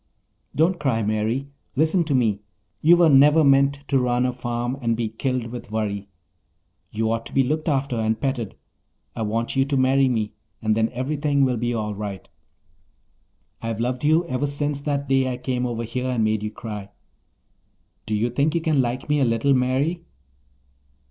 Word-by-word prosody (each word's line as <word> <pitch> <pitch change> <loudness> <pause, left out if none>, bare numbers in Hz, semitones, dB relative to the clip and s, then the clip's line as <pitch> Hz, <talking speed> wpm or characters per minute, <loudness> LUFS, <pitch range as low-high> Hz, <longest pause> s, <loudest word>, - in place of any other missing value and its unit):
"Don't 170 +3 +2
cry, 125 -6 0
Mary. 110 +6 -1 0.3
Listen 160 +5 +2
to 145 -3 0
me. 110 -5 +1 0.4
You 170 +3 +6
were 170 -1 +5
never 150 +2 +6
meant 140 0 +3
to 135 - +3
run 125 0 +1
a 125 - 0
farm 120 0 -3
and 115 -2 0
be 115 -2 -1
killed 125 +2 -2
with 120 -3 -8
worry. 100 -2 -2 0.8
You 110 +1 -1
ought 115 0 -1
to - - -13
be 135 - +4
looked 155 +5 -1
after 135 -3 0
and 110 0 0
petted. 130 -7 -2 0.6
I - - -4
want 115 +3 -1
you 135 - +4
to 140 0 0
marry 135 +1 +4
me 110 -4 -1 0.3
and 110 -1 +1
then 110 0 +2
everything 140 +2 0
will 125 -2 0
be 120 +1 -1
all 105 -2 -2
right. 100 -2 -6 1.3
I've 115 -1 -3
loved 125 +2 -2
you 160 +3 +3
ever 145 -2 -1
since 145 0 -2
that 140 -1 -2
day 135 -1 +2
I 125 - -3
came 125 0 -2
over 115 -1 -3
here 125 +3 -3
and 125 -3 0
made 110 -1 +1
you 105 - -3
cry. 105 -2 -7 1.2
Do 110 - 0
you 115 +3 0
think 145 +6 +1
you 170 - +1
can 155 -4 +2
like 125 +1 -3
me 150 0 +2
a - - +3
little, 115 +3 +2
Mary?" 135 +7 0
125 Hz, 185 wpm, -23 LUFS, 115-140 Hz, 1.3 s, You